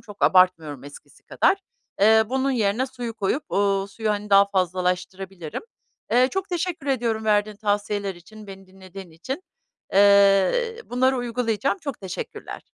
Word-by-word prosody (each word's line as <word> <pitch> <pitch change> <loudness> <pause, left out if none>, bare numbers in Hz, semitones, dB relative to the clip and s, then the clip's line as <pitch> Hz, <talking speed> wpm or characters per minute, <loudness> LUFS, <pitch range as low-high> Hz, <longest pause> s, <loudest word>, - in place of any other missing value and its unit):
Çok 205 -1 -13
abartmıyorum 165 -7 +3
eskisi 145 - -14
kadar. 385 - +2 0.4
Eee, 220 +2 +6
bunun 265 +2 0
yerine 230 +1 0
suyu 245 -3 -7
koyup, 220 +7 -2
uuu, 195 -1 +1
suyu, 215 +2 -3
hani, 210 0 -3
daha 200 0 +7
fazlalaştırabilirim. 185 - -3 0.5
Eee, 250 +2 +4
çok 385 +1 -3
teşekkür 350 -4 -3
ediyorum 230 -5 -1
verdiğin 210 0 +1
tavsiyeler 205 -1 -2
için, 210 +5 -14
beni 195 0 -11
dinlediğin 190 -1 -12
için. 260 - -6 0.5
Eee, 200 - +4
bunları 260 +2 +1
uygulayacağım. 245 - -1
Çok 285 -7 -6
teşekkürler. 190 -2 -7
205 Hz, 135 wpm, -23 LUFS, 190-250 Hz, 0.5 s, daha